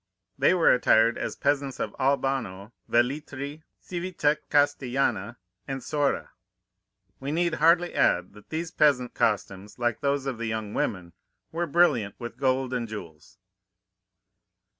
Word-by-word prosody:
They 185 Hz, -, +3 dB
were 175 Hz, -, +5 dB
attired 115 Hz, -2 st, +4 dB
as -, -, -3 dB
peasants 140 Hz, -2 st, -1 dB
of -, -, -3 dB
Albano, 130 Hz, -7 st, -1 dB, 0.2 s
Velletri, 140 Hz, +4 st, -1 dB, 0.2 s
Civita 170 Hz, -4 st, -1 dB
Castellana, 130 Hz, -6 st, +1 dB, 0.3 s
and 135 Hz, -2 st, -4 dB
Sora. 145 Hz, -2 st, -1 dB, 0.9 s
We 135 Hz, +2 st, -4 dB
need 170 Hz, +1 st, +1 dB
hardly 170 Hz, +2 st, +4 dB
add 90 Hz, +1 st, +2 dB
that 105 Hz, 0 st, -16 dB
these 165 Hz, +1 st, -3 dB
peasant 135 Hz, -7 st, +2 dB
costumes, 105 Hz, -3 st, -1 dB
like 120 Hz, -1 st, -1 dB
those 140 Hz, -1 st, 0 dB
of 130 Hz, -4 st, -3 dB
the 115 Hz, -, -2 dB
young 110 Hz, -2 st, -3 dB
women, 90 Hz, -3 st, -2 dB, 0.4 s
were 170 Hz, +1 st, -2 dB
brilliant 140 Hz, -, +2 dB
with 120 Hz, 0 st, -8 dB
gold 130 Hz, -1 st, +1 dB
and 120 Hz, -2 st, -2 dB
jewels. 85 Hz, -7 st, -10 dB
130 Hz, 130 wpm, -26 LUFS, 115-145 Hz, 0.9 s, were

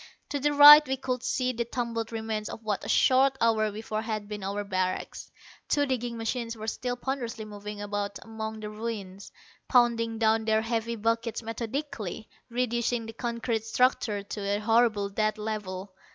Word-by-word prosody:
To 285 Hz, -, -2 dB
the 295 Hz, +2 st, +1 dB
right 295 Hz, +1 st, +11 dB
we 265 Hz, 0 st, -1 dB
could 255 Hz, -1 st, -3 dB
see 255 Hz, 0 st, 0 dB
the 235 Hz, 0 st, -1 dB
tumbled 235 Hz, -1 st, -3 dB
remains 220 Hz, -1 st, -3 dB
of 225 Hz, -, -8 dB
what 210 Hz, -2 st, -2 dB
a -, -, -6 dB
short 265 Hz, +1 st, +4 dB
hour 220 Hz, -2 st, +2 dB
before 215 Hz, +1 st, -4 dB
had 215 Hz, -2 st, -4 dB
been 210 Hz, -1 st, -6 dB
our 200 Hz, +2 st, -2 dB
barracks. 185 Hz, -2 st, -3 dB, 0.4 s
Two 290 Hz, -1 st, +3 dB
digging 245 Hz, -3 st, -2 dB
machines 230 Hz, 0 st, -3 dB
were 215 Hz, -, -6 dB
still 245 Hz, +2 st, -2 dB
ponderously 245 Hz, -3 st, -4 dB
moving 210 Hz, 0 st, -8 dB
about 205 Hz, 0 st, -3 dB
among 220 Hz, -1 st, -6 dB
the 210 Hz, 0 st, -5 dB
ruins, 210 Hz, -3 st, -6 dB, 0.4 s
pounding 230 Hz, -2 st, +3 dB
down 220 Hz, 0 st, +2 dB
their 220 Hz, 0 st, +2 dB
heavy 230 Hz, 0 st, -2 dB
buckets 230 Hz, +1 st, -1 dB
methodically, 225 Hz, -, -4 dB, 0.2 s
reducing 240 Hz, -1 st, -1 dB
the 225 Hz, -, -8 dB
concrete 235 Hz, -1 st, -2 dB
structure 225 Hz, -3 st, +1 dB
to 205 Hz, +1 st, -6 dB
a 200 Hz, +1 st, 0 dB
horrible 220 Hz, -1 st, +2 dB
dead 215 Hz, +2 st, -1 dB
level. 205 Hz, -3 st, -5 dB
225 Hz, 165 wpm, -28 LUFS, 210-240 Hz, 0.4 s, right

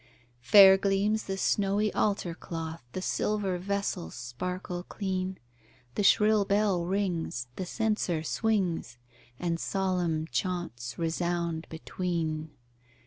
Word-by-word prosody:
Fair 190 Hz, -, +8 dB
gleams 200 Hz, +2 st, +1 dB
the 195 Hz, 0 st, -3 dB
snowy 205 Hz, +2 st, +1 dB
altar 195 Hz, -5 st, 0 dB
cloth, 165 Hz, -1 st, -6 dB
The 185 Hz, -, -4 dB
silver 200 Hz, -4 st, 0 dB
vessels 200 Hz, -, -2 dB
sparkle 175 Hz, +9 st, -4 dB
clean, 190 Hz, 0 st, -3 dB, 0.6 s
The -, -, -1 dB
shrill 210 Hz, +1 st, +5 dB
bell 200 Hz, -3 st, +1 dB
rings, 175 Hz, -, -1 dB
the 185 Hz, -, -4 dB
censer 210 Hz, -7 st, 0 dB
swings, 185 Hz, -, 0 dB, 0.4 s
And 170 Hz, -1 st, -1 dB
solemn 180 Hz, -5 st, 0 dB
chaunts 150 Hz, -10 st, -3 dB
resound 170 Hz, 0 st, -1 dB
between. 160 Hz, -2 st, -3 dB
180 Hz, 105 wpm, -29 LUFS, 165-200 Hz, 0.6 s, Fair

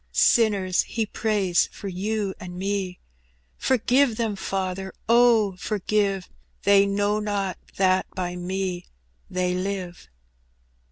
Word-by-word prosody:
Sinners, 200 Hz, -6 st, +3 dB
He 225 Hz, -2 st, -2 dB
prays 205 Hz, -5 st, +1 dB
for 200 Hz, -, -8 dB
you 200 Hz, +2 st, -2 dB
and 180 Hz, -1 st, -8 dB
me: 190 Hz, -1 st, -2 dB, 0.6 s
Forgive 255 Hz, -1 st, +2 dB
them, 225 Hz, -3 st, -1 dB
Father, 190 Hz, 0 st, -3 dB
oh! 230 Hz, -4 st, +4 dB
forgive 200 Hz, -1 st, 0 dB
j -, -, -21 dB, 0.3 s
They 200 Hz, 0 st, +6 dB
know 205 Hz, +1 st, +1 dB
not 200 Hz, -3 st, -2 dB, 0.2 s
that 185 Hz, -1 st, +3 dB
by 180 Hz, -1 st, -3 dB
Me 180 Hz, 0 st, -3 dB, 0.4 s
they 180 Hz, 0 st, 0 dB
live." 185 Hz, -, -4 dB
195 Hz, 115 wpm, -25 LUFS, 185-210 Hz, 0.6 s, They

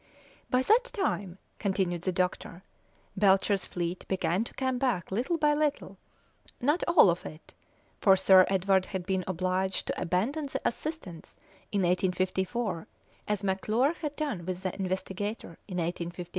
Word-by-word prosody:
"By 255 Hz, +1 st, +2 dB
that 460 Hz, -, +4 dB
time," 205 Hz, -, -2 dB, 0.2 s
continued 190 Hz, -4 st, 0 dB
the 185 Hz, -, -1 dB
doctor, 180 Hz, 0 st, -2 dB, 0.5 s
"Belcher's 195 Hz, 0 st, +3 dB
fleet 175 Hz, 0 st, -3 dB
began 185 Hz, +1 st, 0 dB
to -, -, -9 dB
come 260 Hz, -1 st, -1 dB
back 235 Hz, -11 st, -1 dB
little 250 Hz, -, 0 dB
by 300 Hz, -1 st, +3 dB
little; 290 Hz, -10 st, -1 dB, 0.6 s
not 295 Hz, +8 st, +1 dB
all 335 Hz, -, +7 dB
of 170 Hz, -, -4 dB
it, 155 Hz, +1 st, -11 dB, 0.5 s
for 195 Hz, -2 st, +6 dB
Sir 190 Hz, -1 st, +6 dB
Edward 190 Hz, 0 st, +2 dB
had 190 Hz, -3 st, -4 dB
been 190 Hz, -1 st, 0 dB
obliged 185 Hz, +1 st, -1 dB
to -, -, -3 dB
abandon 220 Hz, -, 0 dB
the -, -, -2 dB
Assistance 230 Hz, -, -6 dB, 0.3 s
in 200 Hz, -, +1 dB
1854, 185 Hz, +2 st, 0 dB, 0.4 s
as 210 Hz, -1 st, -1 dB
McClure 215 Hz, -, +1 dB
had 300 Hz, -3 st, -5 dB
done 285 Hz, -, -3 dB
with 185 Hz, +1 st, -4 dB
the 185 Hz, -, -2 dB
Investigator 190 Hz, 0 st, -4 dB
in 185 Hz, -3 st, -5 dB
1853. 175 Hz, 0 st, -3 dB
190 Hz, 145 wpm, -29 LUFS, 180-245 Hz, 0.6 s, all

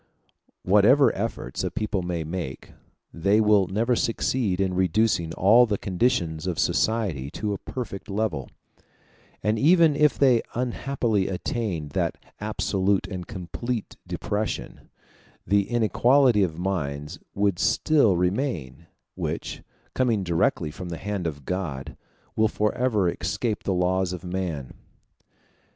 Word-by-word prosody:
Whatever 105 Hz, +9 st, +5 dB
efforts -, -, -3 dB
a -, -, 0 dB
people 105 Hz, -3 st, -2 dB
may 90 Hz, -2 st, -3 dB
make, 80 Hz, -5 st, -6 dB, 0.4 s
they 100 Hz, +5 st, +2 dB
will 105 Hz, -3 st, +4 dB
never 115 Hz, +6 st, +1 dB
succeed 115 Hz, -4 st, 0 dB
in 95 Hz, -1 st, +1 dB
reducing 95 Hz, -1 st, +1 dB
all 115 Hz, +6 st, +6 dB
the 105 Hz, -2 st, 0 dB
conditions 90 Hz, -5 st, 0 dB
of 90 Hz, -3 st, -2 dB
society 100 Hz, -, 0 dB
to 105 Hz, +6 st, -3 dB
a 100 Hz, -, -4 dB
perfect 115 Hz, -5 st, -6 dB
level; 100 Hz, -, -2 dB, 0.9 s
and 105 Hz, +2 st, +1 dB
even 165 Hz, +1 st, +5 dB
if 150 Hz, 0 st, +3 dB
they 125 Hz, -5 st, +4 dB
unhappily 120 Hz, -4 st, 0 dB
attained 95 Hz, -, -3 dB
that -, -, -1 dB, 0.2 s
absolute 100 Hz, -2 st, 0 dB
and 90 Hz, -3 st, -6 dB
complete 110 Hz, +4 st, -5 dB
depression, 105 Hz, +1 st, -4 dB, 0.6 s
the 100 Hz, 0 st, +2 dB
inequality 120 Hz, +1 st, +4 dB
of 85 Hz, -5 st, 0 dB
minds 75 Hz, -4 st, -3 dB, 0.2 s
would 100 Hz, -3 st, +1 dB
still 140 Hz, -, +3 dB
remain, 90 Hz, -, -2 dB, 0.3 s
which, -, -, -4 dB, 0.3 s
coming 115 Hz, -6 st, +1 dB
directly 80 Hz, -3 st, 0 dB
from 90 Hz, +2 st, -7 dB
the 85 Hz, -, -4 dB
hand 100 Hz, -2 st, -3 dB
of 70 Hz, -4 st, -6 dB
God, 85 Hz, -8 st, -4 dB, 0.4 s
will 110 Hz, 0 st, +3 dB
forever 105 Hz, -1 st, +1 dB
escape 95 Hz, +6 st, -2 dB
the -, -, -2 dB
laws 90 Hz, 0 st, +1 dB
of 90 Hz, -, -7 dB
man. 90 Hz, -7 st, -4 dB
100 Hz, 125 wpm, -25 LUFS, 90-115 Hz, 0.9 s, all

